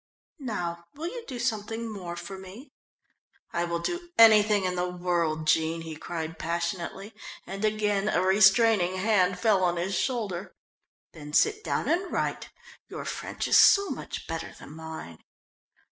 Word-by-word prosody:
"Now 175 Hz, -10 st, -4 dB
will 310 Hz, +3 st, -6 dB
you 480 Hz, +4 st, -7 dB
do 255 Hz, -, -6 dB
something 225 Hz, -1 st, -2 dB
more 185 Hz, -6 st, -6 dB
for 175 Hz, +3 st, -7 dB
me?" 190 Hz, +8 st, -11 dB, 0.8 s
"I 170 Hz, -, 0 dB
will 170 Hz, 0 st, -2 dB
do 345 Hz, -, -4 dB
anything 215 Hz, -2 st, +6 dB
in 185 Hz, -, 0 dB
the 180 Hz, 0 st, -1 dB
world, 170 Hz, -3 st, -1 dB
Jean," 160 Hz, +1 st, +2 dB
he 160 Hz, -1 st, -7 dB
cried 160 Hz, 0 st, -6 dB
passionately, 170 Hz, +4 st, -3 dB, 0.3 s
and 195 Hz, +2 st, -6 dB
again 210 Hz, -1 st, +1 dB
a -, -, +2 dB
restraining 190 Hz, 0 st, +4 dB
hand 185 Hz, -2 st, +2 dB
fell 210 Hz, -5 st, +2 dB
on 175 Hz, -1 st, +1 dB
his 185 Hz, +3 st, -2 dB
shoulder. 195 Hz, -5 st, -2 dB, 0.6 s
"Then 150 Hz, -2 st, -10 dB
sit 430 Hz, -, +3 dB
down -, -, -1 dB
and 360 Hz, +2 st, 0 dB
write; -, -, -2 dB, 0.4 s
your -, -, -7 dB
French -, -, -4 dB
is -, -, +5 dB
so 400 Hz, -1 st, +6 dB
much -, -, -6 dB
better -, -, -5 dB
than -, -, -12 dB
mine." 160 Hz, -, -8 dB
190 Hz, 155 wpm, -27 LUFS, 170-220 Hz, 0.8 s, anything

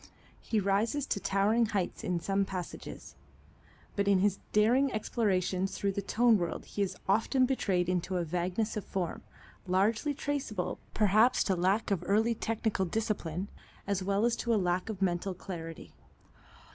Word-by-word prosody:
He 220 Hz, -, -1 dB
rises 210 Hz, +8 st, +1 dB
to 200 Hz, -, -1 dB
towering 210 Hz, +4 st, +2 dB
heights 200 Hz, -4 st, -2 dB
in 180 Hz, -1 st, 0 dB
some 195 Hz, +3 st, +1 dB
passages, 185 Hz, -2 st, -7 dB, 0.8 s
but 200 Hz, -1 st, 0 dB
in 200 Hz, -1 st, +5 dB
his 195 Hz, +1 st, +2 dB
daring 245 Hz, +6 st, +4 dB
explorations 195 Hz, -4 st, 0 dB
through 200 Hz, -, 0 dB
the 200 Hz, -, -3 dB
tone 225 Hz, +2 st, +3 dB
world 170 Hz, -2 st, -3 dB
he 205 Hz, -, -4 dB
is 195 Hz, -, -1 dB
often 225 Hz, +6 st, +3 dB
betrayed 195 Hz, -9 st, 0 dB
into 180 Hz, +1 st, -1 dB
a 175 Hz, -, 0 dB
vagueness 180 Hz, +6 st, -1 dB
of 210 Hz, -, -3 dB
form, 180 Hz, -4 st, -3 dB, 0.5 s
largely 215 Hz, +10 st, +1 dB
traceable 265 Hz, -11 st, -3 dB, 0.2 s
perhaps 215 Hz, +4 st, +4 dB
to 190 Hz, -, +1 dB
lack 190 Hz, +5 st, +1 dB
of 185 Hz, -3 st, 0 dB
early 220 Hz, +4 st, +3 dB
technical 220 Hz, -3 st, -1 dB
discipline, 195 Hz, -3 st, -2 dB, 0.4 s
as 200 Hz, -1 st, -1 dB
well 200 Hz, +3 st, +1 dB
as 240 Hz, -1 st, +2 dB
to -, -, -4 dB
lack 180 Hz, +1 st, 0 dB
of 200 Hz, -3 st, -2 dB
mental 180 Hz, +1 st, 0 dB
clarity. 165 Hz, -3 st, -8 dB
200 Hz, 155 wpm, -31 LUFS, 185-220 Hz, 0.8 s, in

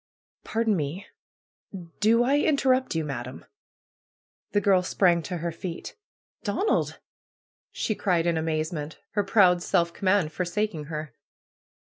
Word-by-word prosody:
^^Pardon 225 Hz, -1 st, 0 dB
me! 165 Hz, +5 st, -3 dB, 0.9 s
Do 230 Hz, +3 st, +4 dB
I 275 Hz, +4 st, +3 dB
interrupt 260 Hz, -, +2 dB
you, 160 Hz, -, 0 dB
Madam?" 130 Hz, -3 st, -6 dB, 1.1 s
The 205 Hz, -, +3 dB
girl 195 Hz, -3 st, +4 dB
sprang 180 Hz, -2 st, +2 dB
to 180 Hz, +2 st, -4 dB
her 170 Hz, +1 st, -3 dB
feet. 165 Hz, +1 st, -7 dB, 0.5 s
PRUE'S 205 Hz, -3 st, -2 dB
GARDENER 430 Hz, -, +1 dB
^^Donald!" -, -, -1 dB, 0.7 s
she 215 Hz, -, -1 dB
cried, 180 Hz, -5 st, +1 dB
in 170 Hz, -1 st, +2 dB
amazement, 155 Hz, -1 st, -2 dB
her 205 Hz, -, +1 dB
proud 190 Hz, -3 st, +4 dB
self 170 Hz, -1 st, +1 dB
command 185 Hz, -5 st, +1 dB
forsaking 180 Hz, -1 st, -2 dB
her. 150 Hz, -3 st, -6 dB
180 Hz, 130 wpm, -26 LUFS, 160-210 Hz, 1.1 s, Do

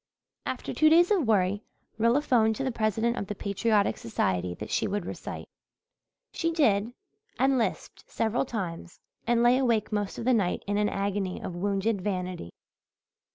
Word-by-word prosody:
After -, -, -4 dB
two 310 Hz, -, +5 dB
days 345 Hz, +4 st, +5 dB
of 355 Hz, -, +2 dB
worry 205 Hz, -1 st, +2 dB, 0.4 s
Rilla 235 Hz, +6 st, +3 dB
phoned 225 Hz, -6 st, +3 dB
to 270 Hz, -, -3 dB
the 265 Hz, -, 0 dB
president 225 Hz, +1 st, 0 dB
of 200 Hz, -, -3 dB
the 210 Hz, -, -4 dB
Patriotic 200 Hz, +1 st, +1 dB
Society 90 Hz, -5 st, -1 dB
that 105 Hz, -, -8 dB
she -, -, +1 dB
would 205 Hz, +1 st, -2 dB
recite. -, -, -7 dB, 0.9 s
She 330 Hz, -1 st, 0 dB
did, 230 Hz, -8 st, +2 dB, 0.4 s
and 265 Hz, 0 st, +3 dB
lisped 220 Hz, -5 st, -3 dB
several 225 Hz, +1 st, 0 dB
times, 185 Hz, -8 st, -5 dB, 0.3 s
and 235 Hz, 0 st, +3 dB
lay 245 Hz, +2 st, +5 dB
awake 230 Hz, -5 st, +1 dB
most 205 Hz, -2 st, -2 dB
of -, -, -5 dB
the 255 Hz, -, +4 dB
night 200 Hz, -6 st, 0 dB
in 205 Hz, 0 st, -1 dB
an 210 Hz, 0 st, +2 dB
agony 195 Hz, -1 st, -2 dB
of 180 Hz, -, -6 dB
wounded 200 Hz, +2 st, 0 dB
vanity. 180 Hz, -, -3 dB
215 Hz, 165 wpm, -28 LUFS, 195-240 Hz, 0.9 s, two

